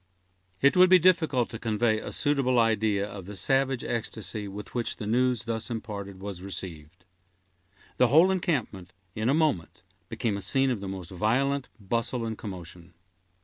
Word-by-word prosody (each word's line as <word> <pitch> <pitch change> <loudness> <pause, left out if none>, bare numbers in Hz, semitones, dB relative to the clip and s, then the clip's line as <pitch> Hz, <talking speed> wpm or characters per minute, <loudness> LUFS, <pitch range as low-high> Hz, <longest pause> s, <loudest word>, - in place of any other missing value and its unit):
It 140 +1 +5
would 185 0 +7
be 185 - +8
difficult 160 -9 +3
to 115 - -6
convey 110 -1 +1
a - - -6
suitable 135 -3 +1
idea 110 -3 +2
of 100 -3 -9
the 105 - -7
savage 135 +5 +1
ecstasy 110 -2 -4
with 100 +1 -8
which 120 -2 -2
the 105 - -6
news 125 +1 +1
thus 115 -1 -4
imparted 100 -4 -6
was 95 -2 -6
received. 90 -2 -7 0.9
The 125 - +5
whole 160 +9 +6
encampment, 125 - -2 0.2
in 110 +4 -1
a 140 - +3
moment, 150 - 0 0.3
became 105 -4 -1
a - - -5
scene 135 +3 +2
of 120 - -2
the 100 - -5
most 95 -2 -7
violent 125 +8 0
bustle 115 +4 -2
and 110 -1 -3
commotion. 90 -4 -9
110 Hz, 165 wpm, -27 LUFS, 100-130 Hz, 0.9 s, be